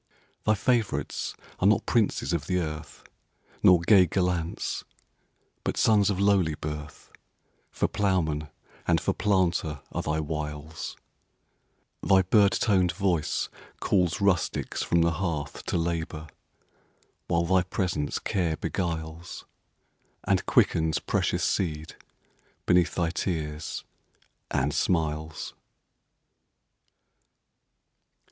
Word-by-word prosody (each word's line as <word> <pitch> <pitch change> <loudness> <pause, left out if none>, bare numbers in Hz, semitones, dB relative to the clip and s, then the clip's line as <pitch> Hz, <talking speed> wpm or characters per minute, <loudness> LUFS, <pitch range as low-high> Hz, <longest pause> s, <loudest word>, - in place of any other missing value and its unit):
Thy 110 - +4
favorites 115 +1 0 0.2
are 95 - +3
not 105 - +3
princes 110 -5 +1
of 75 -4 -2
the 90 - +1
earth, 75 -3 -5 0.6
Nor 90 -2 +6
gay 95 0 +6
gallants; 90 -2 -1 0.8
but - - -2
sons 105 -3 +4
of 100 -2 -1
lowly 100 -6 +3
birth—For 75 0 -7
ploughman 80 -7 0 0.4
and - - +4
for - - 0
planter 85 -7 +1
are - - -2
thy 75 +1 -1
wiles; 75 0 -5 1.0
Thy 95 -1 +4
bird 100 +1 +4
toned 95 -5 +2
voice 90 -6 0 0.3
calls 90 -2 +1
rustics 100 -3 0
from 85 - +2
the 85 - +3
hearthTo 80 -3 -3
labor, 85 -2 -2 1.0
while 85 -1 +2
thy 95 +2 +4
presence 90 -5 -2
care 85 -5 -1
beguiles, 80 -1 -4 0.8
And - - +1
quickens 80 -1 +3
precious - - 0
seed 80 -4 -1 0.7
beneath 90 -1 +3
thy 85 -2 +1
tears 80 -4 -3 0.7
and 70 +3 0
smiles. 80 -2 -1
85 Hz, 100 wpm, -27 LUFS, 80-95 Hz, 1.0 s, Nor